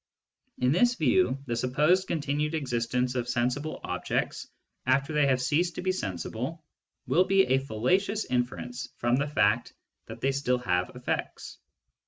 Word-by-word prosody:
In 125 +1 +2
this 240 - +3
view, 155 - +2
the 120 -3 -2
supposed 150 +10 +2
continued 150 0 -1
existence 125 -3 -1
of 125 -1 -2
sensible 125 +5 -1
objects - - -2 0.4
after 140 +3 +2
they 150 -2 +3
have 130 -2 +2
ceased 165 +6 +1
to - - -5
be 185 - +2
sensible 125 - -4 0.4
will 180 +2 +3
be 195 +1 +4
a 130 +1 +3
fallacious 180 - 0
inference 125 0 -3
from 120 +1 +2
the 145 +2 0
fact 110 -5 +1 0.3
that - - -8
they 135 - +1
still 135 -2 0
have 90 -7 0
effects. - - -4
135 Hz, 150 wpm, -28 LUFS, 125-160 Hz, 0.4 s, be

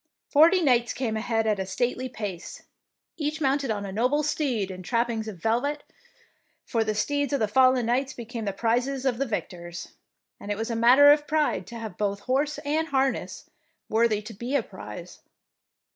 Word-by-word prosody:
Forty 335 +5 +5
knights 245 -4 +3
came 235 -4 -2
ahead 225 0 0
at 210 -2 +1
a 190 - -2
stately 245 +6 -2
pace, 205 -7 -7 0.5
each 305 0 -2
mounted 275 -2 +1
on 205 -2 -2
a 195 - -5
noble 250 +9 +1
steed 265 -10 -1
in 185 0 -8
trappings 230 +1 -1
of 210 -4 -6
velvet, 245 - -1 0.8
for 230 -3 0
the 215 -1 -2
steeds 285 +5 0
of 280 - +1
the 215 - +1
fallen 255 +2 +4
knights 255 +3 0
be 235 - -8
came 230 -1 -6
the 200 - 0
prizes 245 +6 -1
of 250 -3 0
the 275 - 0
victors, 175 -5 -5 0.5
and 205 - -9
it 205 - -1
was 225 +2 -3
a - - -1
matter 255 +5 +7
of 295 0 +2
pride 305 0 0
to 235 - -9
have 225 -2 -7
both 200 -1 -1
horse 285 +3 0
and 315 +3 0
harness 270 -2 -1 0.4
worthy 220 -2 +2
to 225 - -9
be 240 +7 -4
a - - +2
prize. - - -10
240 Hz, 190 wpm, -26 LUFS, 220-275 Hz, 0.8 s, matter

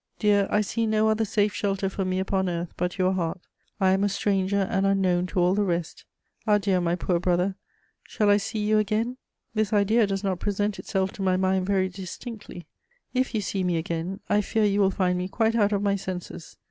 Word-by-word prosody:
Dear, 205 -2 +3
I 210 - +2
see 225 +2 -1
no 215 0 +2
other 220 +1 +1
safe 205 0 +1
shelter 195 -1 -1
for 190 0 -3
me 185 0 -1
upon 190 0 0
earth 170 0 -4
but 180 +1 -2
your 185 0 +2
heart; 175 -1 -2 0.4
I 190 -2 +4
am 190 +1 +2
a 205 - +2
stranger 195 0 0
and 195 0 0
unknown 185 -2 +2
to 185 - -2
all 180 +1 +3
the 205 - +1
rest. 175 -3 -3 0.4
Adieu, 200 -3 +3
my 170 0 +1
poor 180 -1 0
brother. 180 +2 +1 0.5
Shall 210 -2 +2
I 205 - +6
see 210 +1 -3
you 215 0 +4
again? 220 +4 -1 0.4
This 215 -1 0
idea 215 +1 +3
does 195 0 -2
not 190 -3 -1
present 205 +1 -1
itself 190 -1 -1
to - - -8
my 185 -1 +2
mind 190 0 +1
very 190 -2 +2
distinctly. 190 +1 -8 0.5
If 255 -2 0
you 215 - +1
see 195 -1 -2
me 175 -2 +1
again, 170 +4 -3
I 210 - +3
fear 215 +1 +1
you 205 0 +2
will 195 - +4
find 180 -2 0
me 180 - -2
quite 225 +3 +1
out 210 -3 +2
of 200 -1 0
my 200 -1 +2
senses. 185 -3 -7
195 Hz, 215 wpm, -26 LUFS, 185-210 Hz, 0.5 s, I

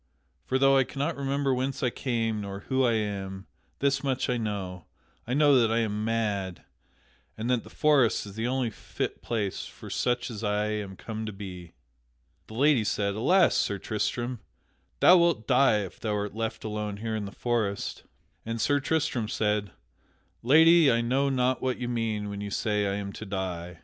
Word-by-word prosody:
For 130 - +1
though 135 0 +5
I 135 - +5
cannot 145 +5 -3
remember 140 0 0
whence 130 +2 -2
I 125 - +2
came, 115 -5 -1
nor 100 0 -6
who 130 +4 0
I 120 -2 +3
am, 100 -3 -3 0.4
this 135 0 +1
much 130 -2 0
I 125 - 0
know 95 -6 -4 0.4
I 125 - -1
know 145 -2 +5
that 115 -2 +3
I 115 - +2
am 105 -1 -2
mad, 105 -6 -1 0.7
and 115 +3 -1
that 125 -3 +1
the - - -13
forest 140 -9 +3
is 100 - -9
the 110 +3 -2
only 130 -2 0
fit - - -5
place 105 -5 -2
for - - -11
such 120 0 0
as 110 -1 -7
I 105 0 0
am 105 -3 -4
come 110 +2 -6
to - - -3
be." 95 -4 -9 0.7
The 110 - -10
lady 140 -2 +4
said: 100 -1 0
"Alas, 170 - +4
Sir 100 - +1
Tristram, 120 +4 -2 0.6
thou 180 - +8
wilt 170 -10 +2
die 125 -4 +4
if 95 - -8
thou 105 -2 -1
art 105 -1 -3
left 110 0 -4
alone 105 -1 -3
here 110 +1 -3
in 105 -2 -3
the 100 - -7
forest." 110 -5 -2 0.4
And 115 0 -4
Sir 145 +6 +2
Tristram 145 -6 0
said: 105 -2 0 0.7
"Lady, 160 +4 +6
I 115 0 +2
know 135 +4 +1
not 130 -1 +1
what 130 -1 -1
you 125 - -4
mean 115 -3 -2
when 100 0 -5
you 100 - -4
say 105 0 0
I 100 - -1
am 100 -1 -5
to 110 - -7
die. 90 -3 -4
115 Hz, 190 wpm, -27 LUFS, 105-130 Hz, 0.7 s, thou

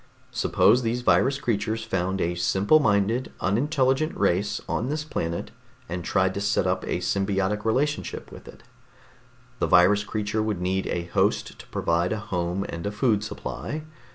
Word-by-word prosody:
Suppose 120 +5 +3
these 120 +1 -1
virus 135 +2 +3
creatures 110 0 -1
found 95 -2 -1
a 85 - 0
simple 95 - +3
minded, 110 0 +1
unintelligent 135 - +1
race 100 +1 +1
on 120 - -1
this 150 +1 -2
planet 85 - -3 0.4
and 90 +1 -4
tried 95 +1 +1
to 100 - -3
set 100 +1 +1
up - - 0
a - - -1
symbiotic 100 +1 0
relationship 140 +7 -1
with - - -12
it. - - -13 1.0
The - - +1
virus 95 +4 +5
creatures 105 +1 -2
would 110 -4 -1
need 95 +1 -1
a 85 - -2
host 85 - 0
to - - -12
provide 85 +4 0
a - - -2
home 95 -3 -2
and 85 +4 -5
a - - -2
food 105 -1 +1
supply. 105 - -5
105 Hz, 160 wpm, -25 LUFS, 95-115 Hz, 1.0 s, virus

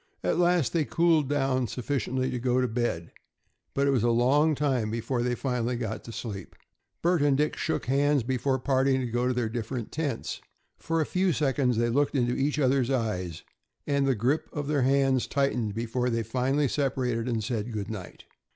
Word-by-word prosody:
At - - +1
last 175 -8 +3
they 165 - +2
cooled 165 -3 +2
down 135 -3 +1
sufficiently 130 +2 -2
to 125 - -2
go 125 +1 +1
to 125 - +2
bed, 110 -8 -2 0.6
but 140 - +2
it 140 - +3
was 130 -4 +2
a 120 - +2
long 140 +7 +3
time 130 -6 0
before 115 +3 -2
they 125 0 0
finally 125 -2 -1
got 110 -2 -4
to 115 - -7
sleep. 105 -5 -7 0.5
Bert 175 -2 +3
and 145 -2 +3
Dick 150 +1 +1
shook 160 - -2
hands 140 +1 +2
before 130 +2 0
parting 130 0 +2
to - - -2
go 120 +1 0
to 130 - +1
their 120 -2 0
different 115 +1 -4
tents. 145 -7 -3 0.4
For 165 0 0
a - - +1
few 185 +2 +1
seconds 135 -5 +1
they 120 0 +2
looked 145 +4 +1
into 120 -2 +2
each 145 +2 0
other's 135 -3 +2
eyes, 95 - -2 0.4
and 140 -1 +1
the 135 - +3
grip 125 +8 0
of 145 -1 -4
their 145 -2 +1
hands 135 -1 +2
tightened 125 -7 0
before 120 +2 -1
they 115 -1 0
finally 130 +6 +1
separated 125 -4 -1
and 115 -2 -1
said 110 +1 -3
good 105 -1 -4
night. 95 -5 -8
130 Hz, 195 wpm, -27 LUFS, 120-140 Hz, 0.6 s, last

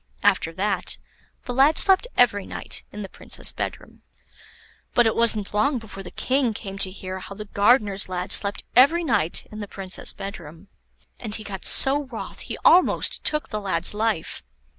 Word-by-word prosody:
] - - -24
After - - -6
that - - -1 0.5
the 245 - -4
lad 275 +5 +4
slept 385 +4 +3
every 205 -5 +3
night - - -3
in 210 - -7
the - - -6
Princess' - - -1
bedroom. - - -6 0.9
But 240 - +5
it 225 - +1
wasn't 220 -4 +3
long 260 +7 +1
before 220 -4 -9
the 180 - -9
King 255 -4 0
came 195 -2 -8
to 195 - +4
hear 185 0 -7
how 190 +1 -9
the 210 +1 -8
gardener's 205 -1 +2
lad 180 0 -4
slept 200 0 0
every 295 +8 +5
night 210 - +1
in 215 - -8
the 205 - -6
Princess' 190 -1 -5
bedroom; 180 -2 -9 0.5
and 220 -3 -5
he 215 - -6
got 195 -2 -7
so 280 +2 +6
wroth 245 -4 -8
he - - -6
almost 360 +2 +4
took 300 0 -1
the 215 -1 -4
lad's 185 -2 0
life. 210 -5 -2
210 Hz, 180 wpm, -23 LUFS, 195-245 Hz, 0.9 s, so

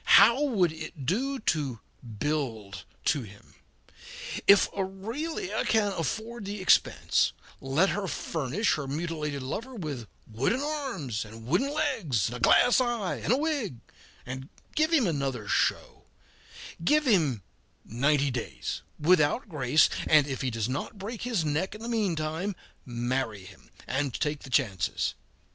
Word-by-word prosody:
How 235 +4 +7
would 200 - +2
it 155 -3 -8
do 265 - 0
to 145 - -1 0.4
build 110 - -3 0.2
to 145 - +2
him? 100 -3 -13 0.9
If 200 0 +7
Aurelia 205 - -3
can 210 -2 +2
afford 220 +7 -3
the 205 +1 -4
expense, 185 - +3 0.3
let 145 +9 +2
her 200 -1 -2
furnish 160 - -1
her 140 -3 -3
mutilated 150 -2 -3
lover 230 - -5
with 145 - -5 0.2
wooden 130 - 0
arms 265 - -3
and 110 +1 -11
wooden 205 - +1
legs, 230 - 0
and 120 - -5
a - - -11
glass 245 - +5
eye 240 -6 -1
and - - -1
a 255 - +4
wig, 285 - -1 0.5
and 130 +2 -6 0.3
give 310 +2 +2
him 300 -8 +4
another 135 - -2
show; - - 0 0.8
give 300 - +3
him 155 - +2 0.4
ninety 140 +4 +2
days, 120 -2 -4 0.2
without 160 - +3
grace, 150 -2 +4 0.2
and 155 -2 +6
if 135 -3 -4
he 130 - 0
does 115 -2 -2
not 140 - -4
break 210 +4 -6
his 230 -9 0
neck 160 +7 -1
in 215 - -10
the - - -4
mean 215 -7 0
time, 160 +6 -2 0.3
marry 120 -4 -2
him - - -15 0.2
and 135 -1 -1
take 150 -1 -1
the 135 - -10
chances. 105 - 0
155 Hz, 145 wpm, -28 LUFS, 130-220 Hz, 0.9 s, How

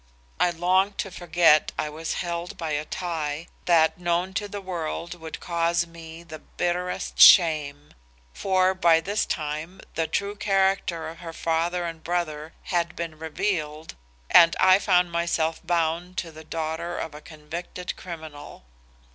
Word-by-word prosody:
I 180 - +4
longed 185 +4 +1
to 195 - -3
forget 170 -3 +3
I 155 - -1
was 155 +2 -4
held 170 0 -4
by 165 -2 -4
a 150 +1 -1
tie, 160 -3 -3 0.2
that 165 -1 +3
known 175 +2 0
to 205 +2 -2
the 205 0 -6
world 175 -2 -4
would 165 -2 -8
cause 170 0 0
me 165 0 -11
the 155 -2 -10
bitterest 175 +3 -3
shame. 150 -4 +6 0.4
For 185 - +2
by 170 -3 +4
this 200 +6 -1
time 155 +4 -4
the 165 -1 -1
true 200 0 -2
character 195 -4 +1
of 165 +1 -9
her 165 -2 -8
father 170 +2 -1
and 165 -1 -6
brother 160 -3 -3 0.2
had 175 0 0
been 165 -2 -6
revealed 160 -2 -3 0.4
and 165 -1 +7
I 190 +1 +6
found 180 -3 +2
myself 170 -1 0
bound 170 +1 -1
to 165 - -3
the 155 0 -12
daughter 160 +2 -4
of 160 - -5
a 150 - -10
convicted 170 +4 -7
criminal. 155 - -9
170 Hz, 150 wpm, -25 LUFS, 160-180 Hz, 0.4 s, and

